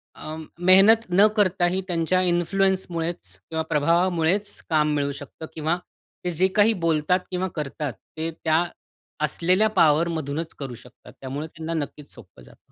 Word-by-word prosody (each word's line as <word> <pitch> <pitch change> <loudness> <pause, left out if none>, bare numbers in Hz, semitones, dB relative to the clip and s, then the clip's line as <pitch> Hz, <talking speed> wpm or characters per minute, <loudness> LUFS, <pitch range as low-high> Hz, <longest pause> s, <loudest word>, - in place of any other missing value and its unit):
अं, 155 +1 -7 0.2
मेहनत 195 +5 +6
न 195 +4 +5
करताही 185 -2 +2
त्यांच्या 175 +1 +1
इन्फ्लुअन्समुळेचं 175 - -1
किंवा 160 0 -2
प्रभावामुळेचं 170 +5 +1
काम 150 -1 +2
मिळू 140 -1 0
शकतं 145 +3 -10
किंवा 160 +2 -1 0.5
ते - - +1
जे 190 - +6
काही 220 +2 +5
बोलतात 165 +3 +2
किंवा 185 +1 -1
करतात, 150 -2 -4 0.2
ते 160 +1 -2
त्या 160 +1 +3 0.6
असलेल्या 185 +8 +2
पावरमधूनचं 160 0 +1
करू 135 -3 -5
शकतात. 125 +1 -16
त्यामुळे 140 +4 -5
त्यांना 160 +1 -6
नक्कीच 145 0 -10
सोपं 95 - -15
जातं. - - -20
165 Hz, 135 wpm, -24 LUFS, 150-185 Hz, 0.6 s, मेहनत